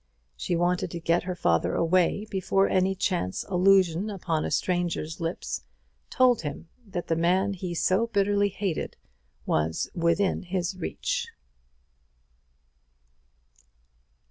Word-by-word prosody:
She 175 Hz, -, -2 dB
wanted 175 Hz, +1 st, +1 dB
to 170 Hz, -, -5 dB
get 170 Hz, +1 st, +1 dB
her 180 Hz, -, -2 dB
father 85 Hz, -, +1 dB
away 185 Hz, +4 st, +2 dB
before 195 Hz, 0 st, +2 dB
any 190 Hz, +1 st, +2 dB
chance 175 Hz, -, -1 dB
allusion 190 Hz, 0 st, +3 dB
upon 170 Hz, -6 st, -2 dB
a -, -, -2 dB
stranger's 175 Hz, -3 st, -1 dB
lips 165 Hz, +2 st, -3 dB, 0.5 s
told 250 Hz, -3 st, +4 dB
him 150 Hz, +2 st, -6 dB, 0.2 s
that 180 Hz, -3 st, -4 dB
the 165 Hz, -, 0 dB
man 185 Hz, +4 st, +2 dB
he 180 Hz, -2 st, -5 dB
so 190 Hz, +7 st, +2 dB
bitterly 205 Hz, -1 st, +2 dB
hated 190 Hz, -4 st, -3 dB, 0.5 s
was 80 Hz, +1 st, 0 dB
within 170 Hz, +3 st, +1 dB
his 180 Hz, 0 st, -2 dB
reach. 185 Hz, -, -3 dB
180 Hz, 115 wpm, -27 LUFS, 170-195 Hz, 0.5 s, told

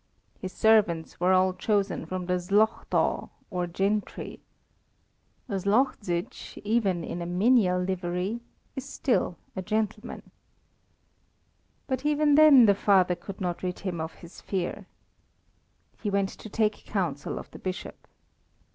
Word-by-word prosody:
His 185 Hz, -, -5 dB
servants 200 Hz, -8 st, +2 dB
were 180 Hz, +2 st, +3 dB
all 185 Hz, 0 st, +4 dB
chosen 195 Hz, -3 st, 0 dB
from 185 Hz, +1 st, -4 dB
the 180 Hz, -, 0 dB
Szlachta, 205 Hz, +5 st, +1 dB, 0.2 s
or 180 Hz, -2 st, -1 dB
gentry. 200 Hz, +4 st, -2 dB, 1.1 s
A 225 Hz, -, -5 dB
Szlachzić, 200 Hz, -4 st, -1 dB
even 200 Hz, -6 st, +1 dB
in 175 Hz, -, -5 dB
a 170 Hz, -, -4 dB
menial 185 Hz, 0 st, +3 dB
livery, 180 Hz, +3 st, -2 dB, 0.4 s
is 265 Hz, -, -4 dB
still 245 Hz, -9 st, 0 dB, 0.2 s
a 190 Hz, -, -2 dB
gentleman. 215 Hz, +3 st, -3 dB, 1.5 s
But 260 Hz, -1 st, -2 dB
even 295 Hz, 0 st, +3 dB
then 290 Hz, -5 st, +8 dB
the 200 Hz, -, +6 dB
father 190 Hz, -2 st, +3 dB
could 180 Hz, +2 st, -8 dB
not 180 Hz, -3 st, -2 dB
rid 180 Hz, -1 st, -3 dB
him 175 Hz, -4 st, -3 dB
of 160 Hz, +1 st, -5 dB
his 170 Hz, -, -13 dB
fear. 185 Hz, -3 st, -3 dB, 1.1 s
He 210 Hz, -, -1 dB
went 200 Hz, -1 st, +1 dB
to 220 Hz, -, -11 dB
take 215 Hz, 0 st, 0 dB
counsel 175 Hz, -9 st, -2 dB
of -, -, -8 dB
the -, -, -11 dB
Bishop. 185 Hz, +1 st, -6 dB
195 Hz, 130 wpm, -27 LUFS, 180-220 Hz, 1.5 s, then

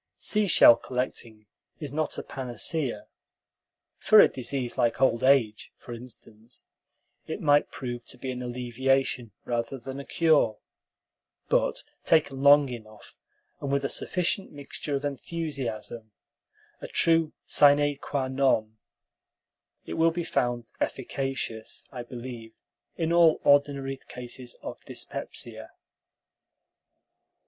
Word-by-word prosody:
Seashell 200 Hz, -, +5 dB
collecting 120 Hz, -4 st, -4 dB, 0.3 s
is 145 Hz, -3 st, -6 dB
not 155 Hz, 0 st, -1 dB
a -, -, -4 dB
panacea. 130 Hz, -1 st, -2 dB, 0.9 s
For 215 Hz, -, +6 dB
a -, -, +9 dB
disease 130 Hz, -1 st, -3 dB
like 120 Hz, +1 st, +1 dB
old 125 Hz, -3 st, +2 dB
age, 130 Hz, -6 st, +3 dB
for 120 Hz, -, -9 dB
instance, 115 Hz, -1 st, -12 dB, 0.6 s
it -, -, -4 dB
might 145 Hz, -1 st, +3 dB
prove 120 Hz, -2 st, -6 dB
to -, -, -5 dB
be 130 Hz, -, -4 dB
an 125 Hz, 0 st, -5 dB
alleviation 125 Hz, 0 st, -1 dB
rather 120 Hz, +2 st, -2 dB
than 135 Hz, +2 st, -7 dB
a -, -, -6 dB
cure; 150 Hz, -10 st, +2 dB, 0.9 s
but -, -, +1 dB, 0.2 s
taken 145 Hz, -4 st, +2 dB
long 145 Hz, 0 st, +7 dB
enough, 110 Hz, -3 st, -11 dB, 0.4 s
and 140 Hz, -, -4 dB
with 140 Hz, 0 st, +1 dB
a -, -, 0 dB
sufficient 185 Hz, +2 st, -1 dB
mixture 145 Hz, 0 st, -5 dB
of 140 Hz, +1 st, -3 dB
enthusiasm, 130 Hz, -7 st, -4 dB, 0.7 s
a -, -, -7 dB
true 165 Hz, -1 st, +3 dB
sine 145 Hz, 0 st, +5 dB
qua 135 Hz, -2 st, -2 dB
non, 130 Hz, -5 st, +1 dB, 1.1 s
it -, -, -6 dB
will 165 Hz, 0 st, +3 dB
be 170 Hz, +1 st, -3 dB
found 120 Hz, -5 st, -1 dB
efficacious, 130 Hz, -4 st, -4 dB
I 125 Hz, -, -6 dB
believe, 120 Hz, -2 st, -9 dB, 0.4 s
in 165 Hz, 0 st, -1 dB
all 170 Hz, -2 st, +5 dB
ordinary 140 Hz, -1 st, +3 dB
cases 125 Hz, 0 st, -7 dB
of -, -, -7 dB
dyspepsia. -, -, -6 dB
130 Hz, 120 wpm, -27 LUFS, 120-145 Hz, 1.1 s, a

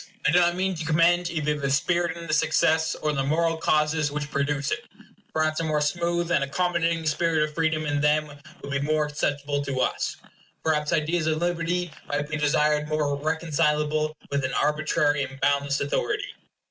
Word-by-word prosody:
I 150 Hz, -, +4 dB
do 175 Hz, -, +5 dB
not 175 Hz, 0 st, +3 dB
mean 190 Hz, +1 st, 0 dB
to 165 Hz, -2 st, -5 dB
commend 170 Hz, +2 st, +3 dB
either 150 Hz, -3 st, -1 dB
the 140 Hz, -1 st, -1 dB
spirit 170 Hz, +5 st, +1 dB
in 170 Hz, -, -7 dB
this -, -, +2 dB
excess, 160 Hz, 0 st, +2 dB
or 150 Hz, -1 st, -1 dB
the 135 Hz, -2 st, 0 dB
moral 165 Hz, +3 st, +1 dB
causes 155 Hz, -1 st, +1 dB
which 145 Hz, 0 st, -4 dB
produce 140 Hz, 0 st, -1 dB
it. 240 Hz, 0 st, -3 dB, 0.4 s
Perhaps 155 Hz, 0 st, 0 dB
a -, -, -1 dB
more 155 Hz, -2 st, +1 dB
smooth 170 Hz, +3 st, 0 dB
and 140 Hz, -, +3 dB
accommodating 170 Hz, +2 st, 0 dB
spirit 155 Hz, 0 st, +1 dB
of 150 Hz, -, -12 dB
freedom 160 Hz, -1 st, 0 dB
in 145 Hz, -1 st, 0 dB
them 150 Hz, +1 st, +3 dB, 0.4 s
would 140 Hz, -, -6 dB
be 140 Hz, -, 0 dB
more 155 Hz, +1 st, +1 dB
acceptable 145 Hz, -1 st, -2 dB
to 135 Hz, -2 st, -3 dB
us. -, -, -1 dB, 0.5 s
Perhaps 150 Hz, -1 st, +1 dB
ideas 160 Hz, 0 st, 0 dB
of 155 Hz, -1 st, +1 dB
liberty 175 Hz, +1 st, -1 dB, 0.2 s
might 145 Hz, 0 st, -2 dB
be 155 Hz, -, -3 dB
desired 150 Hz, 0 st, +2 dB
more 150 Hz, -2 st, 0 dB
reconcilable 155 Hz, 0 st, 0 dB, 0.2 s
with 140 Hz, -1 st, 0 dB
an 130 Hz, -1 st, -2 dB
arbitrary 150 Hz, 0 st, +1 dB
and 135 Hz, 0 st, -5 dB
boundless 140 Hz, 0 st, +1 dB
authority. 410 Hz, -, -2 dB
155 Hz, 185 wpm, -25 LUFS, 145-165 Hz, 0.5 s, do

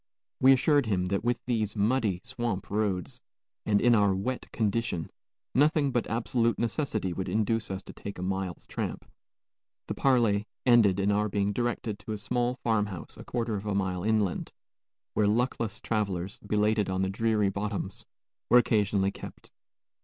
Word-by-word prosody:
We 130 Hz, -, +7 dB
assured 140 Hz, 0 st, +4 dB
him 95 Hz, -4 st, +1 dB
that 100 Hz, 0 st, 0 dB
with 120 Hz, 0 st, +1 dB
these 110 Hz, -4 st, -1 dB
muddy 105 Hz, -3 st, +1 dB
swamp 120 Hz, -7 st, -3 dB
roads, 100 Hz, -4 st, -1 dB, 0.5 s
and 105 Hz, -1 st, +4 dB
in 120 Hz, +2 st, +4 dB
our 100 Hz, -3 st, +4 dB
wet 125 Hz, +7 st, -3 dB
condition, 105 Hz, -6 st, -1 dB, 0.4 s
nothing 145 Hz, 0 st, +3 dB
but 120 Hz, -2 st, 0 dB
absolute 115 Hz, 0 st, +1 dB
necessity 115 Hz, -, -1 dB
would 95 Hz, +1 st, -3 dB
induce 110 Hz, +1 st, 0 dB
us 95 Hz, 0 st, -4 dB
to -, -, -11 dB
take 100 Hz, -, -7 dB
a 90 Hz, -, -5 dB
mile's 95 Hz, -1 st, -3 dB
tramp. -, -, -4 dB, 0.8 s
The -, -, -3 dB
parley 115 Hz, -6 st, +2 dB, 0.2 s
ended 110 Hz, -6 st, +5 dB
in 100 Hz, +1 st, +2 dB
our 105 Hz, +1 st, +1 dB
being 100 Hz, 0 st, 0 dB
directed 120 Hz, -2 st, -2 dB
to 110 Hz, -, -5 dB
a -, -, -3 dB
small 120 Hz, +4 st, -1 dB
farm 110 Hz, -3 st, +2 dB
house 95 Hz, -4 st, -7 dB
a -, -, -10 dB
quarter 115 Hz, -2 st, -2 dB
of 100 Hz, +2 st, -6 dB
a 100 Hz, -, 0 dB
mile 95 Hz, -2 st, -1 dB
inland, 105 Hz, -3 st, 0 dB, 0.6 s
where 105 Hz, -, +2 dB
luckless 115 Hz, 0 st, 0 dB
travelers, 100 Hz, -4 st, -2 dB
belated 105 Hz, -1 st, +1 dB
on 95 Hz, 0 st, 0 dB
the -, -, +1 dB
dreary 110 Hz, -1 st, +1 dB
bottoms, 100 Hz, -1 st, -4 dB, 0.4 s
were 125 Hz, -, +7 dB
occasionally 105 Hz, -4 st, +2 dB
kept. -, -, -11 dB
105 Hz, 165 wpm, -28 LUFS, 100-120 Hz, 0.8 s, We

